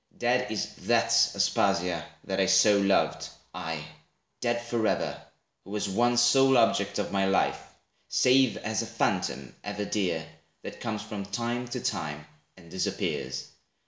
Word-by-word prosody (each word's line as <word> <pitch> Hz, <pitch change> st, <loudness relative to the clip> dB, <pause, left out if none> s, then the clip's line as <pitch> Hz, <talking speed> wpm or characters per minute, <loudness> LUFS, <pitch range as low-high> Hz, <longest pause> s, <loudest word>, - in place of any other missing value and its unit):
Dead 125 Hz, -1 st, +1 dB
is 110 Hz, -, -3 dB
that -, -, +3 dB, 0.2 s
Aspasia, 85 Hz, -2 st, +1 dB, 0.2 s
that -, -, -3 dB
I -, -, +3 dB
so 105 Hz, -1 st, +5 dB
loved, 100 Hz, 0 st, +1 dB, 0.2 s
aye, 80 Hz, -2 st, -5 dB, 0.5 s
dead 120 Hz, -1 st, 0 dB
Forever, 120 Hz, -2 st, -1 dB, 0.4 s
who -, -, -15 dB
was 105 Hz, 0 st, -2 dB
once 120 Hz, +5 st, +2 dB
sole 135 Hz, +2 st, +5 dB
object 100 Hz, -3 st, +2 dB
of -, -, -2 dB
My 95 Hz, -1 st, +1 dB
life; 95 Hz, -, +1 dB, 0.5 s
save 130 Hz, 0 st, +3 dB
as 110 Hz, -1 st, -2 dB
a -, -, -5 dB
phantom, 65 Hz, 0 st, -2 dB
ever 105 Hz, 0 st, -4 dB
dear, 90 Hz, -7 st, -1 dB, 0.4 s
That -, -, -8 dB
comes 110 Hz, -3 st, -3 dB
from 105 Hz, -2 st, -6 dB
time 120 Hz, +4 st, -3 dB
to 120 Hz, -, -4 dB
time, 75 Hz, -1 st, -3 dB, 0.3 s
and 85 Hz, -3 st, -16 dB
disappears. 65 Hz, -7 st, -3 dB
105 Hz, 145 wpm, -28 LUFS, 95-120 Hz, 0.5 s, so